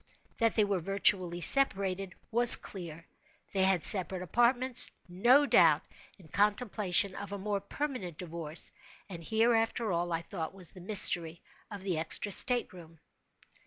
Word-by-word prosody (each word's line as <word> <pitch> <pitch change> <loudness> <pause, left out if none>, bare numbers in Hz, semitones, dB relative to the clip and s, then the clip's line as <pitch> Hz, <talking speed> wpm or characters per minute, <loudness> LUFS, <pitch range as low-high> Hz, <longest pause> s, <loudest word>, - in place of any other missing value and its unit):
That 230 -2 -1
they 215 - +1
were 200 -2 -3
virtually 185 -1 -2
separated 195 -7 +2 0.2
was 240 +1 +8
clear. 165 -4 -12 0.5
They 195 - -2
had 190 -3 0
separate 185 -3 +7
apartments—no 240 - +1
doubt - - +2 0.3
in 185 -5 -20
contemplation 205 -1 -1
of 200 0 -10
a 200 - -7
more 200 +1 -5
permanent 200 - -8
divorce; 165 -2 -7 0.4
and 175 -4 -11
here, 225 +6 -1
after 225 -1 -3
all 175 0 -4
I 165 0 -5
thought 170 -1 -9
was 185 -4 -9
the 185 - -16
mystery 175 -4 +1 0.3
of 205 -3 -11
the 180 -5 -4
extra 165 +5 -1
state 245 +3 0
room. 165 -3 -17
195 Hz, 145 wpm, -28 LUFS, 175-220 Hz, 0.5 s, was